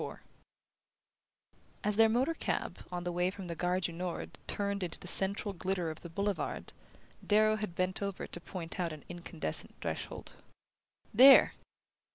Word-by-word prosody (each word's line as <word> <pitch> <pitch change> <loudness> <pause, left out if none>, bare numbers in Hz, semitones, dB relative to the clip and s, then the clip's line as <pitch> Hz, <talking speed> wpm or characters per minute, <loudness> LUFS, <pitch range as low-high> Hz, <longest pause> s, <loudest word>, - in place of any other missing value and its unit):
IV - - -6 1.7
As 210 0 +2
their 225 +1 +6
motor 255 +8 +2
cab, - - -3
on 175 -1 -4
the 175 - -2
way 175 +1 +1
from 190 0 -8
the 170 - -4
Gare 180 +2 0
du 180 - -2
Nord, 175 +1 -5
turned 200 0 -2
into 180 - -4
the - - -10
central 200 +2 +3
glitter 180 -2 -2
of 155 - -10
the 170 - -8
Boulevard, 200 +3 -3 0.5
Darrow 215 +1 +4
had 210 -5 -5
bent 185 +2 0
over 200 -2 -3
to 175 - -4
point 175 -1 -5
out 170 -3 -1
an 150 - -10
incandescent 175 - -2
threshold. - - -5 0.8
"There!" 265 +5 +9
185 Hz, 160 wpm, -32 LUFS, 175-205 Hz, 1.7 s, There